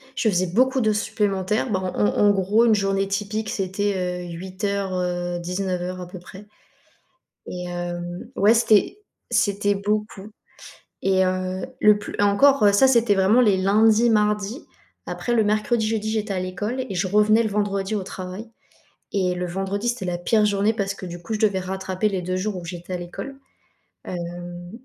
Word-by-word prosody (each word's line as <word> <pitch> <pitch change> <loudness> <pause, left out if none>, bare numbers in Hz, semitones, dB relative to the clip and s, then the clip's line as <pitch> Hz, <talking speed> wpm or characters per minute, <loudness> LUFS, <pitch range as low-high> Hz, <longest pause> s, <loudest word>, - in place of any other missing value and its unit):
Je 220 - +1
faisais 185 -1 +1
beaucoup 255 +8 +2
d'heures 215 -1 +2
supplémentaires, 210 +2 -1
bah, 190 - +1 0.2
en 105 - +2
en 205 - +3
gros, 200 +4 +3
une 225 - +5
journée 195 -1 0
typique, 210 +2 -3
c'était, 185 -2 -2
heu, - - -6
08:00, 190 +2 -3
heu, 175 -1 -2
19:00 180 0 -3
à 180 - -7
peu 180 +1 -9
près 190 +3 -12 1.0
et 180 0 -6
hem, 175 0 -5
ouais, 210 +3 +5
c'était 225 - +3 0.3
c'était 205 0 +1
beaucoup 210 0 -3 0.7
et 190 -1 +3
heu, 185 0 -2 0.2
le 210 -1 +6
plus 205 - -8
et - - +2
encore, 210 +2 +5
ça, 235 +7 +6
c'était 235 -4 +4
vraiment 195 +5 +4
les 205 -5 +4
lundis, 215 +4 +4
mardis, 210 - 0 0.4
après 240 - -3
le 220 - +3
mercredi, 215 +2 +1
jeudi, 215 -1 -1
j'étais 215 -1 -2
à 185 - -2
l'école 210 +8 -3
et - - -5
je 180 +1 0
revenais 210 +3 +4
le 220 - -1
vendredi 200 0 -1
au 205 - -1
travail 185 +4 -7 0.6
et 185 -2 +1
le 180 0 -3
vendredi, 195 +5 -3
c'était 235 -5 -2
la 175 -1 -2
pire 215 +4 +2
journée 205 +1 +2
parce 195 -2 -2
que 185 - -8
du 175 0 -7
coup, 220 +6 -4
je - - -2
devais 205 -3 +2
rattraper 190 +2 -2
les 190 -3 -3
2 185 +1 -2
jours 195 +1 -2
où 175 - -7
j'étais 175 +1 -7
à - - -1
l'école, 175 +10 -7 0.7
hem, 175 0 -7
195 Hz, 180 wpm, -23 LUFS, 185-215 Hz, 1.0 s, le